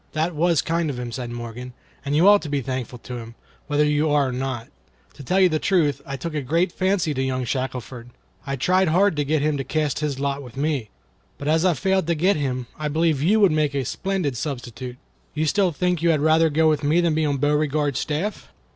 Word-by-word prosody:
(1) 155 - +1
"That 170 +2 -2
was 165 0 +2
kind 165 -1 0
of 135 - -4
him," 120 -1 -5
said 125 0 -5
Morgan; 120 +1 -7 0.3
"and 140 0 -1
you 170 +6 +5
ought 205 0 +7
to 155 - -6
be 145 -1 0
thankful 130 -2 -4
to 125 +1 -8
him, 115 0 -10 0.3
whether 150 0 +2
you 150 +1 +1
are 145 -2 +2
or - - -3
not. 125 -2 -4 0.5
To - - -12
tell 185 +7 +4
the 155 -3 0
truth, 150 -8 +1
I 140 0 -4
took 165 +4 -5
a 150 - -1
great 165 +7 +1
fancy 185 -5 0
to 130 - -2
young 130 -1 -1
Shackelford, 125 -1 -4 0.4
and 135 -1 -3
tried 185 +6 +3
hard 185 +3 +3
to 145 - +2
get 145 +1 0
him 150 -1 +1
to 135 - -2
cast 150 +1 -1
his 145 -3 -2
lot 140 0 -1
with 125 -1 -12
me. 140 -6 -1 0.5
But 140 - -6
as 160 +2 +3
I 180 -3 +3
failed 190 +4 0
to 170 - +1
get 185 +6 +2
him, 130 -4 -2
I 155 - -2
believe 155 -1 +1
you 205 +8 +3
would 200 - +6
make 150 -2 +1
a 135 -2 -1
splendid 185 - -2
substitute. 125 -2 -5 0.4
You 155 +1 0
still 185 +4 +2
think 180 +2 -1
you 170 - +3
had 155 -2 +3
rather 160 +2 +4
go 160 +2 +3
with 155 -2 +2
me 150 +4 +3
than 170 -2 +2
be 160 +1 +1
on 145 -2 0
Beauregard's 145 0 +1
staff?" 165 +8 -3
150 Hz, 235 wpm, -23 LUFS, 135-165 Hz, 0.5 s, ought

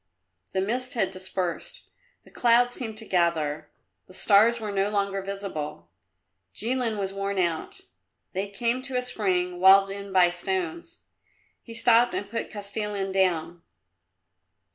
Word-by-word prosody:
The 190 - +1
mist 250 +6 -2
had 205 -5 +2
dispersed; 185 - -4 0.4
the - - -19
clouds 245 0 +4
seemed 225 -4 -4
to 220 - -6
gather; 165 -5 0 0.4
the 185 - -14
stars 220 +5 +4
were 215 -2 -4
no 195 0 +1
longer 200 -1 -1
visible. 180 - -6 0.6
Jilin 235 -1 -1
was 195 -1 -2
worn 195 0 -3
out. 175 - -1 0.5
They 195 +2 -2
came 235 +5 -1
to 260 -1 -2
a 250 - 0
spring 180 -6 -1
walled 195 +1 +7
in 200 0 -7
by 180 -2 +5
stones. 340 - -4 0.6
He 230 - -11
stopped 235 +1 +4
and 200 - -3
put 230 +3 -4
Kostilin 205 -1 -3
down. 175 -3 0
200 Hz, 140 wpm, -26 LUFS, 185-235 Hz, 0.6 s, walled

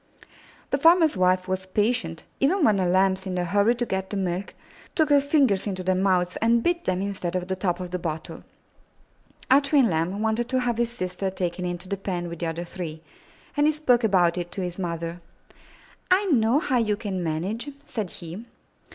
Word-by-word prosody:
The 275 - +1
farmer's 325 -1 +5
wife 185 0 +2
was 185 0 -3
patient, 205 -5 -1 0.2
even 335 +7 +2
when 215 -5 +4
the 185 -2 +1
Lambs, 190 +1 +2
in 185 - -3
their 180 -1 0
hurry 205 +6 +3
to 240 0 -1
get 190 -3 -3
the 205 - -3
milk, 185 0 -3 0.4
took 310 -3 +2
her 285 -1 +6
fingers 275 -9 +2
into 185 -2 -3
their 185 +1 +2
mouths 185 -1 +1
and 230 +1 +3
bit 345 0 0
them 185 +1 0
instead 190 -3 -3
of 180 -1 -2
the 190 - -1
top 180 -1 -1
of 180 -1 -6
the 180 - -2
bottle. 160 -2 -5 1.1
Our 275 +2 +7
twin 280 -6 +3
Lamb 165 +5 -1
wanted 225 +2 0
to 260 0 +1
have 240 -2 -1
his 235 -1 +1
sister 185 -3 -3
taken 180 -1 -3
into 175 +1 -4
the 200 +1 -2
pen 180 -3 -3
with 170 -1 -7
the 170 - -2
other 165 +1 -3
three, 165 -3 -7 0.5
and 290 0 +3
he - - +5
spoke 260 -6 +2
about 180 -4 +3
it 175 0 -5
to 195 - -4
his 180 +1 -5
mother. 170 -1 -4 0.9
'*I 380 +3 +4
know 230 -1 +4
how 290 -6 +1
you 215 -3 +1
can 195 -4 -4
manage," 185 - -2 0.2
said 220 -11 -4
he. 175 +6 -8
190 Hz, 205 wpm, -25 LUFS, 180-240 Hz, 1.1 s, Our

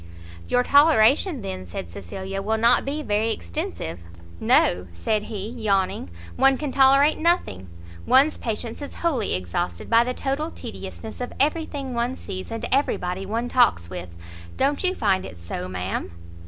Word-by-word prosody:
"Your 245 - +2
toleration, 285 - +4
then," 95 -1 -5
said 85 0 -6
Cecilia, 190 - -6
"will 220 +3 0
not 230 +2 +4
be 295 +3 -3
very 215 -1 +1
extensive." 85 - -4 0.4
"No," 90 +1 +3
said 210 - -1
he, 205 -2 -5
yawning, 200 - -1 0.3
"one 270 0 +4
can 295 -1 -3
tolerate 275 +3 +5
nothing! 315 - 0 0.4
one's 280 +4 +5
patience 225 +2 -4
is 285 - -7
wholly 260 -11 +1
exhausted 90 - -3
by 230 0 +6
the 250 +1 -3
total 285 +4 -2
tediousness 220 -4 -8
of 245 - -4
every 310 +3 +1
thing 275 -3 -5
one 240 +2 -1
sees, 185 0 -7
and 225 0 -4
every 275 +2 +2
body 180 +2 -4
one 230 +4 -2
talks 230 - +3
with. 85 -1 -7 0.4
Don't 280 +5 +1
you 370 0 +1
find 195 - +1
it 90 - -9
so, 85 +1 -6
ma'am?" 90 +1 -3
225 Hz, 160 wpm, -24 LUFS, -, 0.4 s, by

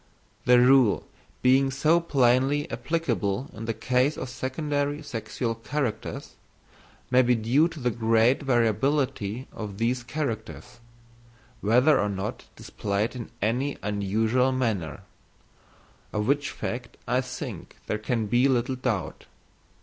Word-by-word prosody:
The 125 0 +6
rule 125 -3 +5 0.4
being 135 +2 +4
so 155 +5 +3
plainly 135 -1 +2
applicable 125 - -1
in 110 - -7
the 115 - -1
case 130 +4 +1
of 130 - -5
secondary 145 +3 -2
sexual 115 -3 -3
characters, 120 +1 -4 0.8
may 130 0 +6
be 125 0 +3
due 120 +8 +3
to 165 -2 -9
the 125 -2 0
great 115 +3 +3
variability 125 -1 0
of 105 -3 -6
these 120 +3 0
characters, 120 -2 -5 0.8
whether 125 +8 +4
or 105 - +1
not 100 +1 -4
displayed 105 +4 -2
in 120 -2 -6
any 125 +6 0
unusual 110 +5 +1
manner—of 110 - -2 1.2
which 140 +2 +1
fact 125 +1 -5
I 125 +2 +2
think 125 - -7
there 105 - -2
can 110 +1 -1
be 120 +6 +3
little 130 0 0
doubt. 120 -6 -3
125 Hz, 120 wpm, -26 LUFS, 110-135 Hz, 1.2 s, The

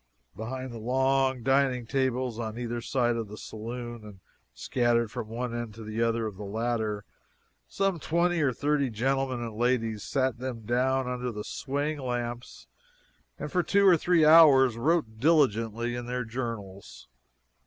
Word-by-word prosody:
Behind 130 +3 -5
the 115 - -7
long 130 +1 +1
dining 135 -2 +2
tables 130 -2 -1
on 110 -1 -4
either 120 -1 -3
side 120 -1 0
of 115 -2 -3
the 105 +1 -10
saloon, 120 +1 -7
and 105 -3 -12 0.3
scattered 115 - 0
from 110 - -5
one 120 +2 -4
end 120 -3 -5
to 115 - -9
the 110 +1 -4
other 115 -1 +1
of 105 -3 -5
the 105 - -7
latter, 110 0 -2 0.6
some 195 -3 -1
twenty 170 +2 +1
or 140 -3 +3
thirty 145 +1 0
gentlemen 130 +2 -1
and 115 -2 -5
ladies 115 -2 0
sat 130 -1 -1
them 125 -2 -5
down 125 +3 0
under 125 0 -3
the 105 -2 -6
swaying 145 +5 -3
lamps 120 -2 -5 0.7
and - - -6
for 180 - +2
two 200 +3 +2
or 185 -3 +8
three 170 0 +3
hours 145 -6 +7
wrote 120 -3 0
diligently 120 -6 +2
in 120 0 -5
their 125 0 -2
journals. 110 - -6
120 Hz, 160 wpm, -28 LUFS, 115-135 Hz, 0.7 s, or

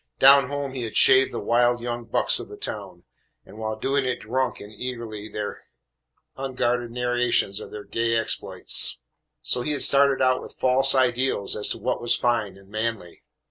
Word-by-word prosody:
Down 135 0 +7
home 140 -2 -4
he 130 - -5
had 115 -2 -6
shaved 130 0 +5
the - - -4
wild 120 +1 +2
young 120 0 -5
bucks 115 - +2
of - - -8
the - - -10
town, - - -5 0.4
and 110 - -14
while 110 0 -3
doing 135 +4 0
it 125 -1 -2
drunk 130 +3 -2
in 105 - -11
eagerly 110 -2 -6
their 105 -1 -6 0.7
unguarded 125 -3 -2
narrations 120 -4 0
of - - -9
their 105 -1 -8
gay 115 0 -1
exploits. 115 -1 0 0.5
So 125 - -1
he 150 +4 -2
had 145 - +2
started 140 -1 +4
out 130 0 +2
with - - -12
false 135 +1 +3
ideals 130 -4 +1
as 105 - +2
to - - -1
what 130 - -2
was 120 0 +2
fine 115 -5 -1
and 100 0 -18
manly. 110 -5 -4
120 Hz, 180 wpm, -24 LUFS, 110-130 Hz, 0.7 s, Down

